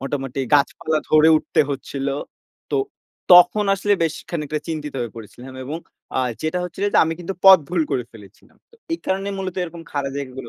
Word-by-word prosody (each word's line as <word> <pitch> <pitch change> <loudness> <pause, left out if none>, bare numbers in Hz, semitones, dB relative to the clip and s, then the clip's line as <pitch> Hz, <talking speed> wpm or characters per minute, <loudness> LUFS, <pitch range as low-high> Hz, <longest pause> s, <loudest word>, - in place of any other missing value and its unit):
মোটামুটি 135 -1 -4
গাছপালা 155 +2 +1
ধরে 155 +1 +6
উঠতে - - 0
হচ্ছিল। 135 0 -4 0.6
তো - - +1 0.6
তখন 190 +4 +7
আসলে 205 +1 0
বেশ 165 -1 0 0.2
খানিকটা 150 -2 -3
চিন্তিত 150 -3 -4
হয়ে 120 -2 -5
পড়েছিলাম 120 +4 -11
এবং 155 +5 -5 0.4
আ - - +2 0.2
যেটা 160 +3 -1
হচ্ছিল 185 +3 -4
যে - - +6
আমি 165 - -1
কিন্তু 185 +3 -5
পথ 190 -1 +10
ভুল 175 -2 +1
করে 125 -2 -1
ফেলেছিলাম। 105 -4 -17
তো - - -22 0.2
এই 330 - -1
কারণে 195 +1 -1
মূলত 190 -2 -4
এরকম 170 -1 -7
খাড়া 140 -1 -2
জায়গাগুলো। 130 -3 -6
155 Hz, 175 wpm, -21 LUFS, 135-180 Hz, 0.6 s, পথ